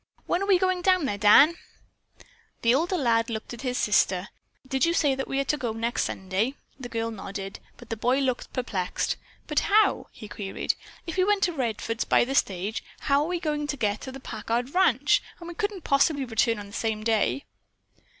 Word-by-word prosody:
When 350 Hz, -, 0 dB
are 395 Hz, -, -1 dB
we 390 Hz, -2 st, +5 dB
going 370 Hz, 0 st, +1 dB
down 370 Hz, -3 st, +3 dB
there, 205 Hz, -6 st, -2 dB
Dan?" 280 Hz, +11 st, +7 dB, 1.1 s
The 230 Hz, +1 st, +5 dB
older 345 Hz, +7 st, +1 dB
lad 230 Hz, -5 st, +2 dB
glanced 225 Hz, 0 st, -5 dB
at 240 Hz, -, -8 dB
his 250 Hz, -2 st, -2 dB
sister. 190 Hz, -2 st, +2 dB, 0.4 s
"Did 265 Hz, 0 st, 0 dB
you 335 Hz, 0 st, +3 dB
say 290 Hz, -4 st, +3 dB
that 265 Hz, 0 st, -3 dB
we 270 Hz, -, -1 dB
are -, -, +2 dB
to 300 Hz, +2 st, 0 dB
go 240 Hz, -5 st, -2 dB
next 230 Hz, +2 st, -1 dB
Sunday?" 195 Hz, +8 st, -2 dB, 0.2 s
The 245 Hz, -2 st, -7 dB
girl 230 Hz, -1 st, -2 dB
nodded, 195 Hz, -2 st, -6 dB, 0.2 s
but 240 Hz, -2 st, -13 dB
the -, -, 0 dB
boy 245 Hz, +4 st, +2 dB
looked 260 Hz, -3 st, -1 dB
perplexed. 195 Hz, -8 st, -2 dB, 0.3 s
"But -, -, +1 dB
how?" 425 Hz, +1 st, +3 dB
he 215 Hz, -, -10 dB
queried. 195 Hz, 0 st, -2 dB, 0.3 s
"If 335 Hz, +1 st, -5 dB
we 370 Hz, -, +4 dB
went 410 Hz, +1 st, +2 dB
to 350 Hz, -, +2 dB
Redfords 230 Hz, -4 st, -2 dB
by -, -, +5 dB
the 265 Hz, -, -3 dB
stage, 200 Hz, -4 st, 0 dB, 0.2 s
how 280 Hz, 0 st, +3 dB
are 300 Hz, -, -1 dB
we 355 Hz, 0 st, -1 dB
to 295 Hz, -3 st, -2 dB
get 210 Hz, -3 st, -1 dB
to 265 Hz, -, -6 dB
the 270 Hz, -, -9 dB
Packard 235 Hz, +2 st, -3 dB
ranch? 295 Hz, -7 st, +3 dB, 0.2 s
And 340 Hz, -, -9 dB
we 345 Hz, -, -6 dB
couldn't 410 Hz, -1 st, -3 dB
possibly 275 Hz, 0 st, +2 dB
return 230 Hz, -1 st, +1 dB
on 205 Hz, -, -7 dB
the 200 Hz, -, -14 dB
same 220 Hz, -1 st, -2 dB
day." 225 Hz, +5 st, +1 dB
255 Hz, 205 wpm, -26 LUFS, 220-305 Hz, 1.1 s, Dan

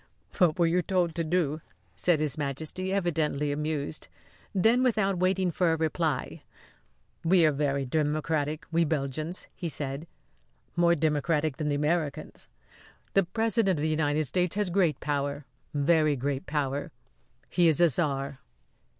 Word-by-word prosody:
"What 180 Hz, -3 st, +4 dB
were 170 Hz, -, +4 dB
you 170 Hz, +2 st, +2 dB
told 180 Hz, -2 st, 0 dB
to 165 Hz, -, -1 dB
do?" 160 Hz, -2 st, 0 dB, 0.3 s
said 175 Hz, -4 st, +2 dB
His 150 Hz, -3 st, +1 dB
Majesty, 155 Hz, +6 st, -3 dB
evidently 155 Hz, -6 st, 0 dB
amused. 150 Hz, 0 st, -3 dB, 0.4 s
Then, 225 Hz, +6 st, +3 dB
without 215 Hz, -7 st, +1 dB
waiting 185 Hz, 0 st, +2 dB
for 170 Hz, 0 st, +2 dB
a -, -, 0 dB
reply; 160 Hz, -3 st, -1 dB, 0.8 s
"We 170 Hz, 0 st, +5 dB
are 155 Hz, -, +4 dB
very 140 Hz, -1 st, 0 dB
democratic 150 Hz, +1 st, -1 dB
we 170 Hz, +1 st, +3 dB
Belgians," 155 Hz, +2 st, -2 dB
he 170 Hz, -, -4 dB
said. 140 Hz, +1 st, -4 dB, 0.7 s
"More 170 Hz, 0 st, +4 dB
democratic 155 Hz, -1 st, 0 dB
than 150 Hz, -1 st, -1 dB
the 145 Hz, -, +1 dB
Americans. 150 Hz, 0 st, -2 dB, 0.7 s
The 195 Hz, -2 st, +4 dB
President 225 Hz, -2 st, +1 dB
of 145 Hz, -, -2 dB
the 155 Hz, -, +1 dB
United 155 Hz, 0 st, +1 dB
States 180 Hz, +6 st, 0 dB
has 205 Hz, -3 st, 0 dB
great 170 Hz, -6 st, +2 dB
power 145 Hz, -1 st, -2 dB, 0.3 s
very 155 Hz, +1 st, +3 dB
great 140 Hz, +1 st, -3 dB
power. 145 Hz, -1 st, -2 dB, 0.6 s
He 175 Hz, -1 st, +3 dB
is 160 Hz, 0 st, +3 dB
a 175 Hz, -, +7 dB
czar." 140 Hz, -2 st, -1 dB
155 Hz, 145 wpm, -28 LUFS, 145-175 Hz, 0.8 s, a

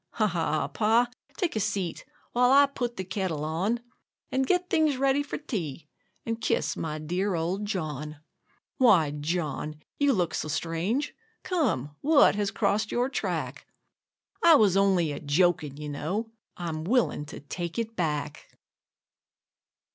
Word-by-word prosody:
Ha! 220 Hz, -, +2 dB
ha! 165 Hz, -5 st, 0 dB
Pa, 230 Hz, +3 st, +2 dB, 0.3 s
take 360 Hz, -, -1 dB
a -, -, +1 dB
seat, 195 Hz, -4 st, -2 dB, 0.3 s
while 245 Hz, +1 st, +4 dB
I 280 Hz, +1 st, +8 dB
put 245 Hz, -4 st, -4 dB
the 190 Hz, -, -2 dB
kettle 185 Hz, -5 st, -2 dB
on, 190 Hz, +10 st, -1 dB, 0.5 s
And 265 Hz, 0 st, +1 dB
get 360 Hz, +2 st, +2 dB
things 310 Hz, -5 st, +2 dB
ready 270 Hz, +1 st, +2 dB
for 285 Hz, -, -4 dB
tea, 165 Hz, -, -5 dB, 0.4 s
and 230 Hz, 0 st, -3 dB
kiss -, -, 0 dB
my 155 Hz, -1 st, -3 dB
dear 180 Hz, +5 st, -1 dB
old 175 Hz, +5 st, -1 dB
John. 155 Hz, -6 st, -4 dB, 0.6 s
Why, 185 Hz, -, +5 dB
John, 150 Hz, 0 st, -3 dB, 0.2 s
you 285 Hz, -1 st, +4 dB
look 175 Hz, -6 st, 0 dB
so -, -, -2 dB
strange! 170 Hz, -, -1 dB, 0.3 s
Come, 215 Hz, -, 0 dB
what 295 Hz, 0 st, +6 dB
has 205 Hz, -1 st, 0 dB
crossed 210 Hz, +1 st, 0 dB
your 245 Hz, +2 st, +1 dB
track? -, -, -3 dB, 0.8 s
I 335 Hz, -1 st, +8 dB
was 210 Hz, -9 st, +4 dB
only 190 Hz, -5 st, +3 dB
a 145 Hz, -, -5 dB
joking, 155 Hz, -1 st, +1 dB
you 150 Hz, 0 st, -6 dB
know; 185 Hz, +11 st, -3 dB, 0.3 s
I'm 160 Hz, -3 st, -4 dB
willing 220 Hz, -, +1 dB
to 150 Hz, -, -8 dB
take 170 Hz, +5 st, -5 dB
it 230 Hz, -1 st, -3 dB
back. 150 Hz, -6 st, -3 dB
190 Hz, 145 wpm, -27 LUFS, 155-240 Hz, 0.8 s, I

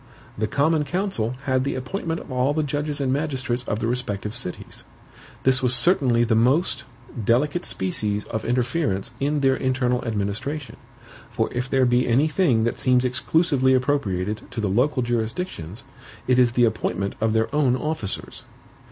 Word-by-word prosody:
The 110 Hz, +1 st, -1 dB
COMMON 150 Hz, +6 st, +2 dB
COUNCIL 145 Hz, -, -1 dB
had 130 Hz, -2 st, +1 dB
the 140 Hz, -, -2 dB
appointment 165 Hz, +5 st, -3 dB
of -, -, -11 dB
all 130 Hz, +3 st, +1 dB
the 155 Hz, -, +1 dB
judges 145 Hz, 0 st, -2 dB
and 130 Hz, -2 st, +1 dB
magistrates 130 Hz, -4 st, -1 dB
of 105 Hz, -, -1 dB
the 110 Hz, -, -2 dB
respective 110 Hz, -4 st, -2 dB
CITIES. 115 Hz, -7 st, -7 dB, 0.6 s
This 130 Hz, 0 st, +3 dB
was 125 Hz, -1 st, +3 dB
certainly 125 Hz, -4 st, +3 dB
the 115 Hz, -1 st, +1 dB
most, 130 Hz, +11 st, +2 dB, 0.4 s
delicate 145 Hz, -, +1 dB
species 105 Hz, +3 st, -2 dB
of 110 Hz, -, -4 dB
interference 120 Hz, -, 0 dB
in 145 Hz, +1 st, 0 dB
their 135 Hz, -1 st, +3 dB
internal 130 Hz, -2 st, 0 dB
administration; 115 Hz, +7 st, -3 dB, 0.5 s
for -, -, -2 dB
if 125 Hz, +2 st, -2 dB
there 130 Hz, -1 st, +3 dB
be 120 Hz, 0 st, +2 dB
any 130 Hz, +6 st, +3 dB
thing 150 Hz, -9 st, +2 dB
that 120 Hz, -, -1 dB
seems 125 Hz, 0 st, +3 dB
exclusively 130 Hz, 0 st, +2 dB
appropriated 105 Hz, -7 st, 0 dB
to 120 Hz, -, -6 dB
the 105 Hz, -3 st, 0 dB
local 125 Hz, +6 st, +1 dB
jurisdictions, 115 Hz, -, -3 dB, 0.4 s
it 125 Hz, 0 st, +4 dB
is 120 Hz, -2 st, +4 dB
the 120 Hz, 0 st, +4 dB
appointment 100 Hz, -2 st, -1 dB
of 110 Hz, 0 st, +2 dB
their 110 Hz, +4 st, 0 dB
own 135 Hz, -4 st, +3 dB
officers. 140 Hz, -7 st, -4 dB
125 Hz, 160 wpm, -23 LUFS, 115-140 Hz, 0.6 s, it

